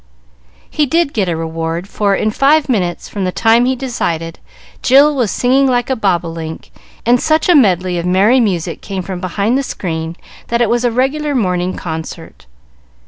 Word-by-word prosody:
He 300 Hz, -1 st, 0 dB
did 330 Hz, 0 st, +1 dB
get 195 Hz, -5 st, 0 dB
a 170 Hz, -, -1 dB
reward, 165 Hz, +2 st, -4 dB
for, 200 Hz, -1 st, 0 dB
in 215 Hz, -, 0 dB
five 285 Hz, +5 st, +3 dB
minutes 185 Hz, -9 st, -1 dB
from 200 Hz, -, -4 dB
the 185 Hz, -, -1 dB
time 225 Hz, +4 st, +3 dB
he 260 Hz, +1 st, +1 dB
decided, 170 Hz, -11 st, -3 dB, 0.4 s
Jill 285 Hz, +3 st, +5 dB
was 245 Hz, -6 st, 0 dB
singing 265 Hz, +5 st, +2 dB
like 245 Hz, 0 st, 0 dB
a -, -, +2 dB
bobolink, 170 Hz, -6 st, -3 dB, 0.3 s
and 245 Hz, +1 st, +3 dB
such 310 Hz, 0 st, +1 dB
a 360 Hz, -, +5 dB
medley 185 Hz, -, +3 dB
of 170 Hz, -, -4 dB
merry 200 Hz, +8 st, +4 dB
music 180 Hz, -7 st, -1 dB
came 190 Hz, -2 st, -5 dB
from 185 Hz, -1 st, -5 dB
behind 200 Hz, +7 st, 0 dB
the -, -, 0 dB
screen, 165 Hz, -9 st, -4 dB, 0.3 s
that 235 Hz, -, 0 dB
it 235 Hz, -2 st, +2 dB
was 240 Hz, +1 st, +1 dB
a 245 Hz, -, +3 dB
regular 275 Hz, +5 st, -1 dB
morning 180 Hz, -5 st, 0 dB
concert. 160 Hz, -, -7 dB
210 Hz, 180 wpm, -15 LUFS, 175-255 Hz, 0.4 s, Jill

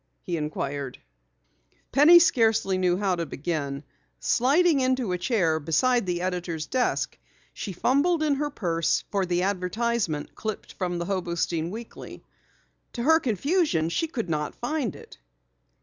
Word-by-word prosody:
he 175 Hz, -, -3 dB
inquired. 145 Hz, -3 st, -4 dB, 0.9 s
Penny 300 Hz, +5 st, +8 dB
scarcely 225 Hz, -, +3 dB
knew 180 Hz, -1 st, +2 dB
how 195 Hz, -2 st, +1 dB
to 170 Hz, -1 st, -3 dB
begin. 140 Hz, -1 st, -3 dB, 0.4 s
Sliding 285 Hz, -, +3 dB
into 255 Hz, -5 st, +1 dB
a 180 Hz, -, 0 dB
chair 175 Hz, -6 st, +1 dB
beside 200 Hz, -, +1 dB
the 175 Hz, -1 st, -1 dB
editor's 175 Hz, -4 st, -3 dB
desk, 255 Hz, -1 st, -1 dB, 0.3 s
she 200 Hz, -, -5 dB
fumbled 285 Hz, -, +2 dB
in 300 Hz, -2 st, +2 dB
her 295 Hz, +1 st, -1 dB
purse 165 Hz, -, 0 dB
for 195 Hz, -2 st, 0 dB
the 175 Hz, 0 st, 0 dB
advertisement 195 Hz, -3 st, -1 dB
clipped 215 Hz, -2 st, -6 dB
from 180 Hz, -2 st, -3 dB
the 170 Hz, -, -3 dB
Hobostein 170 Hz, -3 st, -1 dB
Weekly. 225 Hz, +4 st, -9 dB, 0.7 s
To 235 Hz, -, -3 dB
her 320 Hz, +4 st, +5 dB
confusion 260 Hz, -, +1 dB
she 325 Hz, -, -1 dB
could 245 Hz, -, -4 dB
not 150 Hz, -2 st, -2 dB
find 250 Hz, -, -2 dB
it. -, -, -14 dB
190 Hz, 140 wpm, -26 LUFS, 170-255 Hz, 0.9 s, Penny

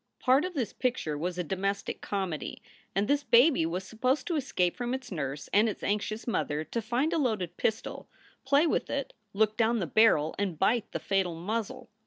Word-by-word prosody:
Part 265 Hz, +5 st, +4 dB
of 365 Hz, -1 st, -5 dB
this 250 Hz, -6 st, -2 dB
picture 245 Hz, -, -1 dB
was 175 Hz, +4 st, -3 dB
a 180 Hz, -, 0 dB
domestic 195 Hz, +3 st, -2 dB
comedy, 190 Hz, -6 st, -3 dB, 0.3 s
and 200 Hz, +1 st, +1 dB
this 285 Hz, 0 st, +2 dB
baby 245 Hz, -, +5 dB
was 180 Hz, +3 st, -3 dB
supposed 255 Hz, +8 st, 0 dB
to 340 Hz, -, -1 dB
escape 185 Hz, -, 0 dB
from 245 Hz, +1 st, -2 dB
its 260 Hz, -4 st, -8 dB
nurse 145 Hz, -4 st, -4 dB
and 215 Hz, +3 st, +5 dB
its 210 Hz, -, -6 dB
anxious 210 Hz, +2 st, -1 dB
mother; 155 Hz, -10 st, -1 dB
to 230 Hz, +8 st, -3 dB
find 245 Hz, +9 st, 0 dB
a 330 Hz, -, +2 dB
loaded 210 Hz, -, -1 dB
pistol, 220 Hz, 0 st, -2 dB, 0.3 s
play 280 Hz, +3 st, +4 dB
with 320 Hz, -, 0 dB
it, 280 Hz, -1 st, -3 dB, 0.2 s
look 215 Hz, +1 st, +2 dB
down 230 Hz, +1 st, +3 dB
the 195 Hz, -, -1 dB
barrel, 165 Hz, -5 st, +4 dB
and 190 Hz, -5 st, -1 dB
bite 220 Hz, +6 st, +1 dB
the -, -, -2 dB
fatal 190 Hz, -4 st, 0 dB
muzzle. 210 Hz, +6 st, -4 dB
215 Hz, 195 wpm, -29 LUFS, 180-255 Hz, 0.3 s, baby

